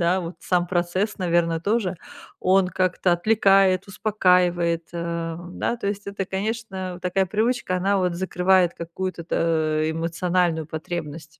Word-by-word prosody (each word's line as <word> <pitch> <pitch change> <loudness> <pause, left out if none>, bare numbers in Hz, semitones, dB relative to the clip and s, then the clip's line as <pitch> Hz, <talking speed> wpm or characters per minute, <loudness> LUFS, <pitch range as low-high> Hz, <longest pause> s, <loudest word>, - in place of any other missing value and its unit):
да, 175 +2 +2
вот 170 0 -6
сам 180 -1 +1
процесс, 185 +4 -1
наверно, 170 -2 +1
тоже, 200 -1 0 0.4
он 185 0 +3
как-то 185 -1 +1
отвлекает, 195 0 +3
успокаивает, 180 -5 +2
э, 170 -1 -3 0.2
да, 235 - -2
то 215 - -5
есть, 205 +1 -3
это, 200 -1 -3
конечно, 190 -2 -4
такая 190 +1 +1
привычка, 215 -2 0
она 195 +2 +1
вот 180 -2 0
закрывает 180 0 +2
какую-то 170 +1 -5
то 155 -2 +1
эмоциональную 165 0 0
потребность. 160 -1 -6
180 Hz, 130 wpm, -23 LUFS, 170-195 Hz, 0.4 s, он